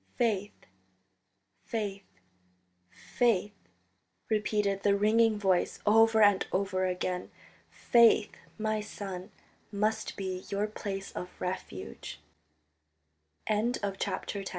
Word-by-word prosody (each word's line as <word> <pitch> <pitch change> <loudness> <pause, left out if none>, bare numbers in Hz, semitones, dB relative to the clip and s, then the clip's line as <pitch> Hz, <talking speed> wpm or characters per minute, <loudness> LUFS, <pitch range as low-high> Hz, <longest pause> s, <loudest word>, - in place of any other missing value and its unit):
"Faith, 210 -4 -1 1.0
faith, 205 -3 -4 0.8
faith," 205 - 0 0.8
repeated 210 -2 0
the 200 0 +3
ringing 220 +1 +3
voice 190 -3 +1
over 220 +1 +5
and 205 -2 +4
over 185 -1 0
again. 180 0 -2 0.4
"Faith, 230 -3 +4 0.3
my 215 0 0
son, 195 -3 -7 0.4
must 215 +1 -1
be 185 -1 -4
your 200 +1 0
place 200 -2 -5
of 180 - -6
refuge." 95 - -6 1.3
XI 220 +3 +1
THE - - -3
POPE 195 0 -3
OF 200 -1 -4
THE - - -4
205 Hz, 105 wpm, -30 LUFS, 190-215 Hz, 1.3 s, over